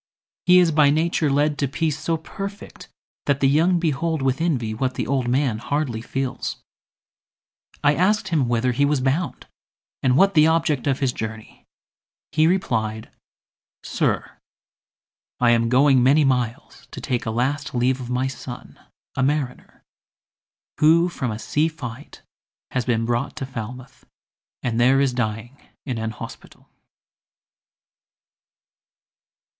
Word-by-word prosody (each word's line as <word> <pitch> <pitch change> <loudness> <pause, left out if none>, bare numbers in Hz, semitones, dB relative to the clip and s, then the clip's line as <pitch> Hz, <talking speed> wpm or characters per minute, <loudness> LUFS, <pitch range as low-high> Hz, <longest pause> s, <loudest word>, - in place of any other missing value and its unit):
He 180 0 +7
is 175 -2 +5
by 150 -2 +5
nature 160 +1 +1
led 145 +2 +1
To 140 - +1
peace 155 +2 -2
so 165 -1 -1
perfect, 195 +5 -8 0.4
that 140 -1 +2
the 135 - +3
young 165 +6 +3
behold 160 -2 -1
With 135 +2 0
envy, 125 -10 0
what 130 +3 -2
the - - -2
old 130 -2 0
man 125 -3 +1
hardly 130 -3 -2
feels. 130 +1 -3 1.3
—I 145 0 +5
asked 190 +4 +1
him 150 -7 +1
whither 120 +1 +1
he 125 +4 +1
was 145 0 +2
bound, 135 +7 -1 0.6
and 130 -1 +3
what 195 +4 +5
The 155 -2 +6
object 155 -4 +1
of 135 -1 0
his 130 -3 +1
journey; 110 0 -8 0.6
he 155 0 +3
replied 110 - -1 0.7
"Sir! - - -2 1.0
I 120 -1 +4
am 115 0 +2
going 130 +1 +5
many 140 +4 +4
miles 125 -3 -2
to - - -8
take 120 -3 -2
A - - +1
last 130 +5 -2
leave 130 +2 +1
of 125 - -7
my 125 +1 0
son, 130 -2 -8 0.4
a - - -1
mariner, 140 -1 -2 1.0
Who 165 +3 +5
from 130 -7 -3
a 110 - -4
sea 150 +7 0
fight 145 -4 -9 0.5
has 130 -2 -1
been 115 -2 0
brought 120 +4 -1
to 145 -3 -4
Falmouth, 125 +1 -8 0.6
And 120 -2 -1
there 130 +3 +4
is 135 -2 +2
dying 120 +2 -3 0.3
in 125 -5 -3
an 110 0 -2
hospital." 110 - -11
135 Hz, 140 wpm, -22 LUFS, 120-155 Hz, 1.3 s, He